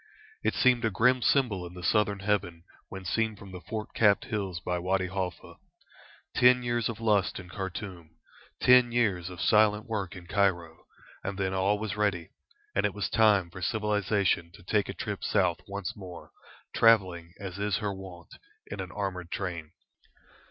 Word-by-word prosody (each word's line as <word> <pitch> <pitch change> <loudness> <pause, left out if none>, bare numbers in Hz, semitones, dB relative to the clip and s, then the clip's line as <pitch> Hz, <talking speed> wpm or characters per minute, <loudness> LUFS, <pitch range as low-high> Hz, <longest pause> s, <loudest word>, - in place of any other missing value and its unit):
It - - +1
seemed 125 -2 +3
a 110 - +2
grim 125 +5 +3
symbol 115 -9 +2
in 90 - -13
the 90 - -9
southern 100 +1 +1
heaven 90 -5 -1 0.3
when 95 -1 -8
seen 110 +3 0
from 100 -1 -12
the 90 -1 -8
fort 110 +2 -6
capped 105 -3 +3
hills 100 -7 -3
by 90 +1 -2
Wady 95 +1 0
Halfa. 95 -2 -5 0.8
Ten 125 0 +5
years 120 -1 0
of 115 - -5
lust 105 -5 +1
in 90 -1 -11
Khartoum, 95 -3 -6 0.5
ten 125 -1 +6
years 100 -7 +1
of 90 -2 -10
silent 105 0 +3
work 100 -5 -3
in 90 -2 -10
Cairo, 85 -4 0 0.4
and 95 0 -4
then 95 -1 -1
all 95 +2 +2
was 105 -1 -4
ready, 100 -6 -1 0.4
and - - +1
it - - 0
was - - -2
time 105 -6 +4
for 95 - -9
civilisation 105 -5 0
to - - -16
take 105 +3 0
a - - -5
trip - - -5
south - - +1
once 100 +3 -5
more, 90 -5 -10 0.4
travelling 95 -7 +3
as 95 -2 -6 0.2
her 105 -3 -2
wont 95 -3 -10
is - - -15 0.3
in 105 - -7
an 95 -2 -5
armoured 95 -4 -4
train. 85 -6 -4
100 Hz, 175 wpm, -28 LUFS, 90-110 Hz, 0.8 s, ten